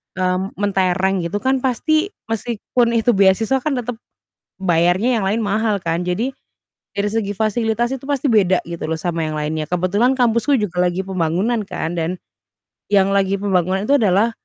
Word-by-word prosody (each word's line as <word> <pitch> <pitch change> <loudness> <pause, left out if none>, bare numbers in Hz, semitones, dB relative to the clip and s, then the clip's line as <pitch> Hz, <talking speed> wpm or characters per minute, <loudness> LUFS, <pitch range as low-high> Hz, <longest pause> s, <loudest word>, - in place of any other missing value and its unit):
eee, 185 -1 +1 0.2
mentereng 190 -1 +1
gitu 205 +5 -3
kan 265 0 +2
pasti 310 +7 +1 0.2
meskipun 235 +1 0
itu 230 +1 +3
beasiswa 200 +5 +3
kan 295 +2 -2
tetap 245 -1 -4 0.6
bayarnya 180 +7 +2
yang 195 - -1
lain 210 +4 0
mahal 210 -1 0
kan. 170 +1 -1
Jadi 195 +9 -1 0.6
dari 200 +1 -1
segi 210 -2 -1
fasilitas 225 +2 0
itu 265 - -14
pasti 280 0 0
beda 190 -4 +3
gitu 170 -2 -5
loh 160 0 -2
sama 165 -2 -1
yang 155 - -3
lainnya. 155 +1 -2
Kebetulan 190 +8 +2
kampusku 240 +3 +2
juga 180 -3 0
lagi 180 +1 0
pembangunan 190 +5 0
kan 170 -3 -4
dan 170 +2 -2 0.8
yang 195 -1 +4
lagi 195 0 +2
pembangunan 190 -1 +1
itu 285 +1 +4
adalah, 210 0 +3
200 Hz, 160 wpm, -19 LUFS, 180-230 Hz, 0.8 s, yang